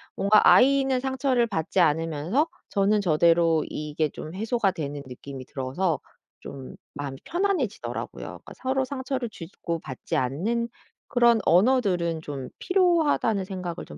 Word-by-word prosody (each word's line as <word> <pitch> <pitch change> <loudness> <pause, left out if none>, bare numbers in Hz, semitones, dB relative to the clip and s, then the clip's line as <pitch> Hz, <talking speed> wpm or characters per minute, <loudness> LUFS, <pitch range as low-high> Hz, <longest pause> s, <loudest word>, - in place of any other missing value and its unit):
뭔가 210 +2 +5
아이는 270 0 +5
상처를 265 -2 +1
받지 190 -3 -1
않으면서 165 - +2 0.2
저는 205 +1 +2
저대로 165 -2 +3
이게 150 0 -2
좀 155 +3 -8
해소가 220 0 +1
되는 145 -5 -5
느낌이 130 +1 -9
들어서 145 +7 -2 0.4
좀 135 -2 -9 0.2
마음이 140 -2 -5
편안해지더라고요. 345 - -2
그러니까 - - -10
'서로 265 +1 0
상처를 260 -2 -3
주지 170 -4 -10
고 170 -1 -2
받지 130 -5 -4
않는 195 - -1 0.4
그런 235 -2 +4
언어들은 180 -5 +3
좀 140 -4 -6
필요하다.'는 330 - +2
생각을 180 -3 -5
좀 75 - -10
190 Hz, 330 characters per minute, -26 LUFS, 155-250 Hz, 0.4 s, 뭔가